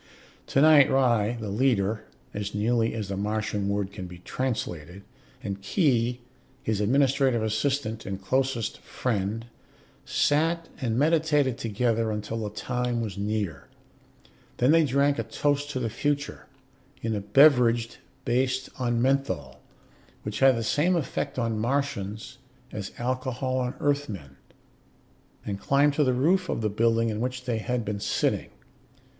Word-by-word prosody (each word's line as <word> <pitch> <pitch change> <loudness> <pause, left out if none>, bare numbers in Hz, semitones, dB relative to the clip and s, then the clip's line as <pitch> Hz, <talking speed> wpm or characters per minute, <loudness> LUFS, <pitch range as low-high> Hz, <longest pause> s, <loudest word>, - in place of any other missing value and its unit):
Tonight 145 0 +6
Ry, 120 -4 +2
the 105 -3 -4
leader 110 -3 +1 0.3
(as 105 0 -4
nearly 115 +2 +1
as 105 -3 -4
the 100 - -2
Martian 105 0 -1
word 100 -1 -1
can 95 -2 -7
be 90 0 -10
translated), 90 - -4 0.4
and 100 -1 -4
Khee, 125 - +1 0.4
his 110 -2 0
administrative 130 +1 +2
assistant 110 0 -1
and 95 -1 -4
closest 125 +3 -1
friend, 110 -1 -2 0.6
sat 165 +3 +1
and 115 -3 0
meditated 150 -3 +2
together 115 0 0
until 105 +1 -3
the 105 -2 -3
time 125 +3 -2
was 110 -4 -3
near. 100 -7 -3 0.9
Then 125 +4 +4
they 165 0 +5
drank 140 -1 +2
a - - 0
toast 145 +5 -1
to 135 - -3
the 120 - -1
future 140 - -2 0.6
in 110 -1 -1
a 100 - -2
beverage 120 -3 +4 0.3
based 130 +1 0
on 120 -1 +1
menthol, 130 - -1 0.6
which 105 0 -4
had 135 -2 +5
the 115 - -2
same 155 +10 +2
effect 145 -3 -2
on 115 -3 -1
Martians 115 -5 -2 0.3
as 100 -2 -5
alcohol 130 +1 -2
on 125 +1 -2
Earthmen 105 - -2 1.1
and 100 -1 -3
climbed 140 +4 +3
to 150 - +2
the 130 -2 +2
roof 180 +9 +2
of - - -1
the 110 - +1
building 115 +1 +2
in 105 -1 -3
which 125 0 -3
they 120 -3 -1
had 120 +1 -2
been 100 0 -3
sitting. - - 0
120 Hz, 140 wpm, -26 LUFS, 105-135 Hz, 1.1 s, Tonight